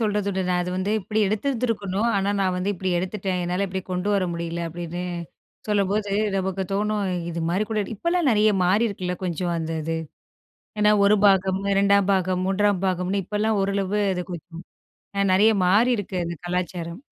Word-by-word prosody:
சொல்றதுண்டு. 205 -3 0
"நான் 180 0 +2
அது 180 - -4
வந்து 190 +2 -1
இப்பிடி 215 +3 -1
எடுத்துருந்துருக்கணும். 220 -2 -1
ஆனா, 195 +1 +1
நான் 185 -1 +1
வந்து 185 +3 -1
இப்பிடி 190 -1 -3
எடுத்துட்டேன். 190 0 -2
என்னால 180 +3 -1
இப்பிடி 190 0 -4
கொண்டு 180 +2 -1
வர 190 -2 +2
முடியல." 170 0 -3
அப்பிடின்னு 175 +1 -5 0.6
சொல்லும்போது, 200 0 +1 0.2
நமக்கு 190 0 -1
தோணும், 210 +1 0 0.3
இதுமாரி 170 +4 -1
கூட 215 - 0
இப்பலாம் 340 - +1
நிறைய 215 -1 +4
மாறியிருக்குல்ல, 190 -1 +1
கொஞ்சம் 175 0 -1
அந்த 160 0 -4
இது. 165 +1 -2 0.8
ஏன்னா, 210 0 +5
1 210 +1 +5
பாகம், 190 -1 +3 0.2
2 200 0 +3
பாகம், 185 -1 +1
3 195 -1 +1
பாகம்ன்னு 185 +2 0
இப்பல்லாம் 210 +2 0
ஓரளவு 200 +1 0
அது 180 -1 -3
கொஞ்சம் 170 0 -8 0.6
அ - - +4
நெறைய 210 +4 +5
மாறியிருக்கு 205 0 +2
அது 170 - -3
கலாச்சாரம். 175 +2 -3
190 Hz, 155 wpm, -24 LUFS, 180-210 Hz, 0.8 s, ஏன்னா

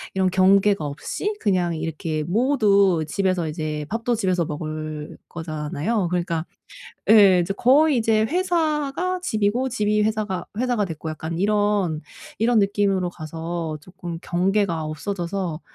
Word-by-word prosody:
이런 190 -1 +2
경계가 195 0 +4
없이 150 - -3
그냥 180 -5 +1
이렇게 155 -1 -3
모두 200 - +3
집에서 185 -2 0
이제 155 -1 -3
밥도 230 +2 -1
집에서 185 -5 0
먹을 155 0 -5
거잖아요. 160 +5 -2
그러니까 170 -2 -1 0.7
예 200 -5 +7
인제 185 +3 -1
거의 285 +3 +4
이제 220 -1 +2
회사가 335 - 0
집이고 220 - 0
집이 210 -3 +1
회사가 215 -4 -2
회사가 245 -4 +1
됐고 160 -1 -6
약간 160 +2 -5
이런 205 -5 +1 0.4
이런 230 +1 +3
느낌으로 195 -2 +1
가서 165 -1 -5
쪼끔 175 -2 -8
'경계가 180 -2 0
없어져서 175 +1 -3
190 Hz, 295 characters per minute, -23 LUFS, 165-215 Hz, 0.7 s, 예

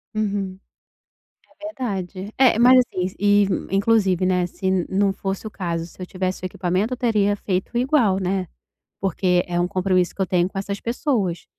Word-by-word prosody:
Uhum. 200 -3 -2 1.0
É - - -7
verdade. 200 - -5
É, 255 -4 +4
mas, 255 +2 +7
assim, 185 -6 -1
e 205 0 +4 0.3
inclusive, 195 -3 +2
né, 180 -1 +2
se 190 0 -1
não 195 0 +2
fosse 195 +2 -4
o - - -8
caso, 170 -4 -3
se 175 - -14
eu 185 - -4
tivesse 185 0 -3
o - - -2
equipamento, 185 +7 -1
teria 210 -5 +1
feito 190 +5 -2
igual, 245 -7 +2
né, 185 -1 -1 0.5
porque 180 -1 +1
é 175 0 -1
um 175 - +1
compromisso 185 -1 0
que 195 - -4
eu - - +2
tenho 180 0 +1
com 195 - -9
essas 200 +1 -3
pessoas, 230 - -1
195 Hz, 170 wpm, -22 LUFS, 185-210 Hz, 1.0 s, mas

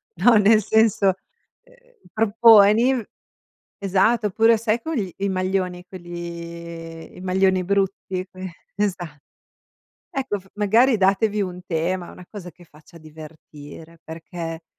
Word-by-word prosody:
no 245 -2 +4
nel 215 +1 +4
senso, 215 -3 +3 0.5
ehm, - - -26 0.2
proponi 225 +2 +5 0.8
esatto, 205 +3 +1
oppure 225 +3 +3
sai 230 +1 0
con 320 - -4
gli 195 -6 -3
i 200 0 -2
maglioni, 185 -1 -2
quelli 170 -2 -9
i - - -10
maglioni 185 0 +1
brutti? 195 -1 -2
Que 185 -1 -8 0.2
esa 180 -7 -3 0.9
ecco 260 -7 -3
f 190 - -22
magari 225 +5 +3
datevi 200 +2 +1
un 180 -1 -6
tema, 175 +2 -2
una 180 - -13
cosa 185 -4 -9
che 175 - -19
faccia 155 +1 -18
divertire, 155 +1 -13
perché 165 0 -8
190 Hz, 120 wpm, -22 LUFS, 170-215 Hz, 0.9 s, proponi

